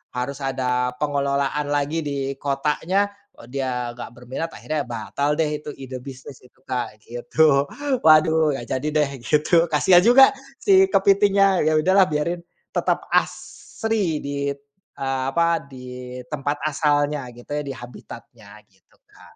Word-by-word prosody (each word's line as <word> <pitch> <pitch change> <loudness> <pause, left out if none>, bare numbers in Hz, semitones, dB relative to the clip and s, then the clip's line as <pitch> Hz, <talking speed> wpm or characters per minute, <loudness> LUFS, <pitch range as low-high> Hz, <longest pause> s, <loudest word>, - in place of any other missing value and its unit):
harus 125 +3 -3
ada 125 -2 -1
pengelolaan 140 0 0
lagi 145 +2 0
di 140 -3 -3
kotanya, 155 +8 0 0.3
eee, 115 - -14
dia 125 -2 -2
nggak 120 - -8
berminat, 125 +6 -5
akhirnya 150 -3 -3
batal 120 +5 -2
deh 150 -1 -1
itu 150 - -16
ide 130 -1 -8
bisnis 130 +1 -11
itu 125 +1 -23
Kak, 120 -5 -4
gitu. 140 +4 +2 0.4
Waduh, 155 -1 +5
gak 120 -2 -7
jadi 150 - -4 0.2
deh 140 - -2
gitu. 160 +5 +3
Kasihan 165 +3 +5
juga 260 +4 +7 0.3
si 385 -1 +6
kepitingnya. 195 - +3
Ya 155 - +3
udahlah 185 +4 +4
biarin. 155 +4 -1 0.3
Tetap - - 0
asri 205 -9 -1
di, 140 0 -3 0.5
eee, 135 -1 -2
apa, 170 +3 +2
di 125 -1 -9
tempat 145 0 -2
asalnya 145 -2 0
gitu 120 +4 -14
ya, 150 0 -1
di 135 - -3
habitatnya 115 -3 -12
gitu 95 -2 -32
Kak. - - -19
145 Hz, 140 wpm, -22 LUFS, 130-160 Hz, 0.5 s, juga